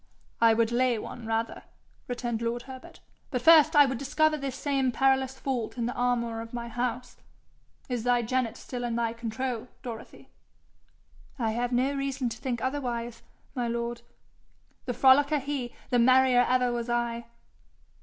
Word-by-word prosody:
'I 225 -1 +6
would 230 0 +2
lay 245 0 +2
one 225 +1 -7
rather,' 225 +1 -2 0.5
returned 240 -2 -3
lord 235 +1 -2
Herbert. 260 -1 -11 0.3
'But 250 -3 -3
first 315 0 +7
I 290 -1 +8
would 265 -3 -2
discover 305 +3 +2
this 275 -3 -4
same 275 -2 0
perilous 265 0 +1
fault 255 -4 -3
in 235 - -1
the 245 - -2
armour 235 -2 -1
of 230 +1 -8
my 235 0 -5
house. 245 +1 -3 0.7
Is 245 -4 -3
thy 245 -1 +2
genet 245 0 -1
still 245 -1 -6
in 235 -1 -2
thy 230 -1 0
control, 235 +1 -4 0.2
Dorothy?' 230 -3 -9 1.1
'I 225 -4 0
have 240 +2 -2
no 255 +3 +1
reason 275 -2 -2
to 230 - -7
think 245 -1 -3
otherwise, 240 -4 -3 0.3
my 245 -3 -2
lord. 235 0 -3 0.8
The 245 - -3
frolicker 280 +3 +5
he, 270 -3 -4 0.2
the 245 - +3
merrier 255 0 +5
ever 250 -1 +2
was 240 0 -3
I.' 235 0 -1
245 Hz, 160 wpm, -28 LUFS, 235-265 Hz, 1.1 s, I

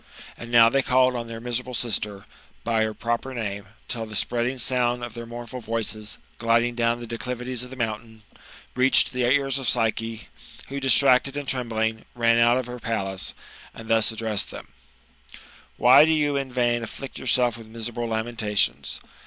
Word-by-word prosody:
And 120 - -9
now 115 -1 +7
they 135 +4 +2
called 130 -1 +3
on 120 -1 -4
their 115 0 -7
miseral^e 125 +1 -4
sister 105 -4 -2 0.4
by 115 -1 +1
her 110 - -3
proper 120 +4 -3
name, 100 -3 -4 0.2
till 115 -2 -4
the 110 - -8
spreading 120 +3 0
sound 125 -1 +1
of 120 -2 -6
their 115 0 -8
moumfdl 120 +2 -7
voices, 110 -2 -4 0.2
gliding 115 +1 +2
down 120 0 +1
the 120 - -7
declivities 125 +2 -4
of 125 - -9
the 130 - -9
monntain, 110 -2 -4 0.5
reached 130 0 +4
the 125 - -2
ears 135 -1 +2
of 130 - 0
Psyche, 115 -1 -1 0.4
who, 140 +1 -4
distracted 135 0 +3
and 145 -1 -4
trembling, 110 -3 -1
ran 115 -1 +3
out 120 +1 +5
of 130 - -2
her 125 0 -7
palace, 95 -6 -3 0.4
and 110 0 -10
thus 115 0 +4
addressed 110 -2 -2
them: - - -10 0.6
*' - - -20
Why 130 +4 +8
do 160 - +3
you 150 -2 +1
in 135 -2 -2
vain 120 -1 +1
afflict 130 +4 -7
yourself 125 -2 +2
with 115 -1 -11
miserable 115 +1 -4
lamentations? 110 -2 0
120 Hz, 175 wpm, -24 LUFS, 115-125 Hz, 0.6 s, Why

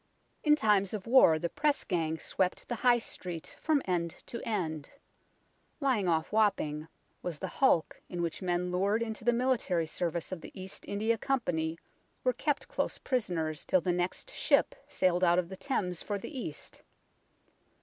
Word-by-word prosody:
In 300 -1 +6
times 210 -6 +2
of 200 - -6
war 230 -10 +6
the 170 - -1
Press 290 - +1
Gang 160 -3 -1
swept 185 +2 -1
the - - -2
High 245 +1 +5
Street 180 -7 -5
from 305 -3 +2
end 170 -3 -1
to 235 - -6
end. 160 -9 -2 0.9
Lying 255 -10 +1
off 160 -2 +1
Wapping 160 -8 +1 0.3
was 175 -4 -4
the - - -4
hulk 220 - +2
in 175 -1 -3
which 165 -2 -3
men 180 -1 0
lured 200 +5 +1
into 220 -1 -5
the 240 - +4
military 235 -9 +1
service 170 +1 -2
of 185 -3 -4
the - - -10
East 190 +1 -7
India 220 +3 0
Company 170 -13 0 0.5
were - - +3
kept - - -1
close - - -2
prisoners 170 - -1
till 185 - +3
the 180 +2 +1
next 180 - -2
ship - - +3
sailed 180 0 +1
out 175 -1 +5
of 180 -1 0
the 190 - -6
Thames 185 - -2
for 205 - -2
the 235 +9 -8
East. 190 - -6
185 Hz, 170 wpm, -31 LUFS, 170-230 Hz, 0.9 s, In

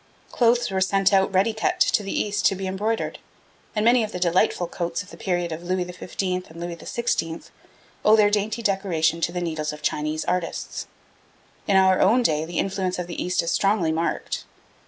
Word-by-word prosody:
Clothes 240 -2 +2
were 190 0 0
sent 195 +1 +3
out 190 0 +4
ready 195 +4 +2
cut 220 - -1
to - - +3
the 195 - -5
East 205 0 -1
to 195 - +1
be 190 +1 -5
embroidered, 210 +4 -2 0.6
and 210 0 +1
many 240 0 +5
of 215 - -4
the 180 - -5
delightful 175 0 +2
coats 170 +2 -3
of 200 - -16
the - - -10
period 175 -2 -2
of 160 +1 -5
Louis 180 +1 -1
XV. 180 +2 -6 0.3
and 165 +1 -12
Louis 175 0 -4
XVI. 165 -3 -2 0.6
owe 215 - +6
their 210 -1 +4
dainty 215 +2 -1
decoration 175 -5 +1
to 170 - +1
the 180 0 -3
needles 155 -3 -2
of 150 0 -10
Chinese 155 +1 -1
artists. 180 -1 -3 0.8
In 200 - +3
our 190 -1 +4
own 245 +2 +4
day 155 -5 +1
the 170 0 -6
influence 190 -1 -1
of 180 - -3
the 175 -1 -4
East 180 -1 0
is 170 - -1
strongly 195 -5 +2
marked. 165 +1 -2
185 Hz, 200 wpm, -24 LUFS, 170-205 Hz, 0.8 s, owe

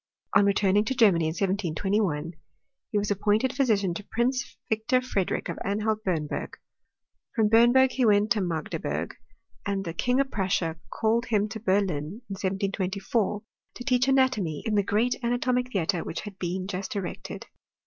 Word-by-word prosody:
On 200 0 +6
returning 200 0 +3
to 265 - -1
Germany 190 -9 +4
in 160 +1 -1
1721, 190 -3 0 0.6
he 210 - +1
was 205 0 0
appointed 210 +5 +1
phy 275 0 +3
sician 200 -6 +1
to 205 - -6
Prince 240 +4 -1
Victor 220 +3 +1
Frederick 210 -7 -2
of - - -5
Anhalt 215 +2 -1
Bernburg. 160 -6 -2 0.8
From 220 -3 +3
Bernburg 240 +3 +6
he 260 - 0
went 210 +1 +3
to 215 -4 +3
Magdeburg; 165 -4 -3 0.5
and 195 -1 -2
th^ 165 -1 -5
King 250 +8 +1
of 275 -1 +1
Prussia 185 -4 0
called 230 +2 0
him 210 -3 +2
to 220 +1 -6
Berlin 195 -2 +2 0.3
in 200 - -7
1724, 195 +2 -1 0.3
to 245 - -7
teacji 250 -1 +2
anatomy 255 - +2
in 220 - 0
the 205 - +4
great 215 +5 +1
anatomic 250 +1 0
theatre 180 -3 0
which - - -5
had 205 -2 -9
been 185 +1 -2
just 190 0 -4
erected. 195 -3 -5
205 Hz, 160 wpm, -27 LUFS, 190-235 Hz, 0.8 s, On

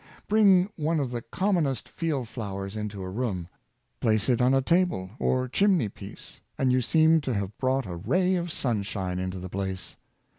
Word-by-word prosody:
Bring 200 -4 +5
one 160 0 0
of 135 -4 -2
the 120 -1 -3
commonest 165 - 0
field 150 -8 -2
flowers 100 -3 -5
into 105 -2 -4
a 95 - -5
room, 95 -6 -2 0.5
place 110 +1 +2
it 125 -1 +3
on 125 +1 +4
a - - +4
table 170 - +1
or 130 0 +1
chimney 180 - +2
piece, 100 0 -11 0.2
and 130 -1 +2
you 130 0 +3
seem 160 +4 +4
to 130 -5 -2
have 100 0 -3
brought 130 0 +1
a 90 -2 -5
ra}^ 185 - +2
of 170 -1 -4
sunshine 100 -8 -2
into 95 0 -3
the 90 0 -6
place. 95 -1 -5
125 Hz, 180 wpm, -27 LUFS, 100-160 Hz, 0.5 s, Bring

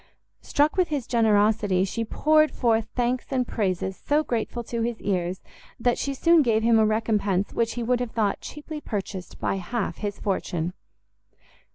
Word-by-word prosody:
Struck 295 +4 +1
with 365 -2 +3
his 290 -6 -2
generosity, 210 -4 +3
she 230 +4 -2
poured 310 +6 +3
forth 225 -2 +1
thanks 245 0 0
and 255 -2 0
praises 190 -3 -1
so 300 +1 +2
grateful 240 -2 -2
to 235 0 -3
his 235 -1 -2
ears, 185 -2 -2 0.4
that 240 +1 +1
she 275 -1 -2
soon 335 +3 +5
gave 225 -5 +2
him 230 -1 +5
a 220 - +5
recompense 210 -3 0
which 230 -1 0
he 240 - -3
would 245 +1 +1
have 245 -1 -2
thought 215 -3 0
cheaply 300 +1 -7
purchased 195 -5 -5
by - - -1
half 200 +4 -3
his 205 -1 -4
fortune. 180 -3 -2
225 Hz, 170 wpm, -25 LUFS, 205-250 Hz, 0.4 s, soon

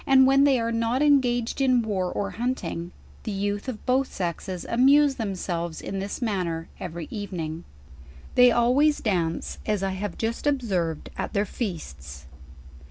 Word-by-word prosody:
*n 265 -1 +7 0.2
they 270 -3 +4
are 230 0 -1
not 230 +4 +1
engaged 250 -4 +2
in 255 -3 +4
war 190 -4 -1
or 200 -1 -2
hunting, 185 -8 -3 0.3
the 215 - -4
youth 205 +3 -2
of 225 -4 -7
both 260 +1 +1
sexes 180 0 -4
amuse 275 +4 +5
themselves 180 -7 -3
in 195 - -4
this 200 +5 -4
manner 175 -7 -2
every 170 -2 -6
evening. 170 -6 -4 0.7
They 250 0 +7
always 255 +6 +3
dance, 170 -6 -1
as 210 -3 0
I 195 - 0
have 190 0 -4
jp.tst 230 +5 -2
observed 190 - -1
at - - -3
their 205 -1 +1
feasts. 75 - -6
205 Hz, 150 wpm, -25 LUFS, 175-250 Hz, 0.7 s, n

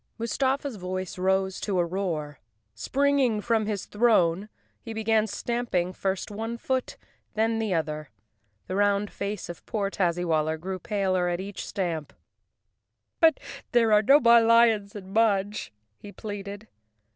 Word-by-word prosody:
Mustafa's 265 +2 -1
voice 185 +1 -5
rose 190 0 +1
to 200 -3 -1
a 175 - +2
roar. 165 -6 -3 0.3
Springing 270 - +1
from 220 0 0
his 205 -3 -3
throne, 205 -4 +2 0.3
he 225 - -7
began 220 0 +1
stamping 220 -7 -2
first 190 +1 -3
one 225 +3 -4
foot, 260 +1 -2 0.4
then 225 +1 +1
the 215 -5 0
other. 155 -2 -3 0.6
The 185 - -4
round 205 0 +2
face 200 -1 -4
of 175 - -9
poor 200 -3 -1
Tazzywaller 165 -4 0
grew 185 +2 -5
paler 185 -2 0
at 175 0 -2
each 200 +1 -6
stamp. 165 -7 -3 1.1
"But 325 -3 +5 0.3
there 230 -2 +4
are 210 - +6
no 275 +7 +6
more 235 -3 +6
lions 225 -3 +4
in 195 -1 -9
Mudge," 210 -2 +1 0.3
he 205 - -10
pleaded. 205 0 -7
205 Hz, 140 wpm, -26 LUFS, 185-225 Hz, 1.1 s, are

